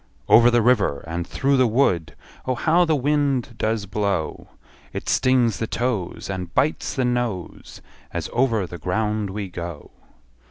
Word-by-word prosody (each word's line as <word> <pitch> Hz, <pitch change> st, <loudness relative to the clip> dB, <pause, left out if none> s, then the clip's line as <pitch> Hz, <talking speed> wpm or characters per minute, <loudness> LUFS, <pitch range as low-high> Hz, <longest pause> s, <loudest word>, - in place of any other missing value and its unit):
Over 120 Hz, +1 st, +7 dB
the 120 Hz, -1 st, +3 dB
river, 105 Hz, -, +2 dB
and 85 Hz, +1 st, -4 dB
through 140 Hz, 0 st, +1 dB
the 130 Hz, -1 st, +4 dB
wood, 90 Hz, -, +1 dB, 0.3 s
Oh, 130 Hz, -, +1 dB
how 170 Hz, +6 st, +3 dB
the 160 Hz, -2 st, +2 dB
wind 140 Hz, -3 st, 0 dB
does 110 Hz, -1 st, 0 dB
blow! 100 Hz, -5 st, -2 dB, 0.5 s
It -, -, -5 dB
stings 125 Hz, -4 st, +2 dB
the 115 Hz, -, -2 dB
toes, 110 Hz, -8 st, -2 dB
And 90 Hz, -3 st, -5 dB
bites 145 Hz, +4 st, 0 dB
the 130 Hz, -, +1 dB
nose, 120 Hz, -7 st, -3 dB, 0.3 s
As -, -, -3 dB
over 115 Hz, -5 st, +2 dB
the 85 Hz, 0 st, -9 dB
ground 105 Hz, +4 st, -1 dB
we 100 Hz, +1 st, -4 dB
go. 85 Hz, -3 st, -7 dB
115 Hz, 155 wpm, -23 LUFS, 95-130 Hz, 0.5 s, Over